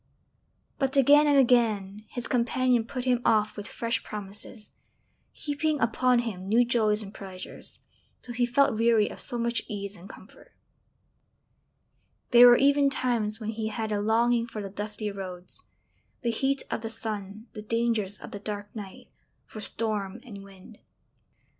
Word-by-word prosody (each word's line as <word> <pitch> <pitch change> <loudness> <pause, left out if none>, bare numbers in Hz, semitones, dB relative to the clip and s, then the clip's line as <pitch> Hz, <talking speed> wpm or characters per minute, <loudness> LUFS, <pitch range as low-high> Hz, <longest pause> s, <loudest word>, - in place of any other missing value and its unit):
But 270 0 0
again 290 +3 +6
and 290 -1 +4
again 215 -5 +2
his 245 -2 -5
companion 245 -1 +1
put 250 +1 -5
him 250 -1 +2
off 215 -1 +2
with 205 0 -7
fresh 230 +2 -2
promises 210 +1 -5 0.6
heaping 300 0 -2
upon 250 +2 +2
him 190 -4 -5
new 235 +4 +4
joys 220 -3 +1
and 200 0 -10
pleasures, 190 -2 -9 0.4
till 240 - -6
he 245 0 +1
felt 245 -3 +2
weary 230 -2 +3
of - - -9
so 240 - -1
much 235 0 0
ease 200 -1 -5
and 185 +1 -13
comfort; - - -15 1.8
there 245 0 +9
were 240 0 +8
even 280 +1 +4
times 230 -5 -1
when 220 -1 -3
he 220 0 -3
had 220 0 -3
a 205 -1 0
longing 230 +2 +2
for 225 - -7
the 200 -2 -6
dusty 210 +1 -4
roads, 185 -2 -8 0.6
the 235 - +1
heat 270 +4 0
of - - -2
the 225 - -4
sun 215 -2 -5
the 215 - -7
dangers 220 -2 0
of - - -11
the 205 - -6
dark 205 0 -6
night 200 -3 -9 0.4
for 215 - -9
storm 210 -1 -3
and 200 -5 -10
wind. 195 +2 -15
225 Hz, 160 wpm, -27 LUFS, 205-245 Hz, 1.8 s, there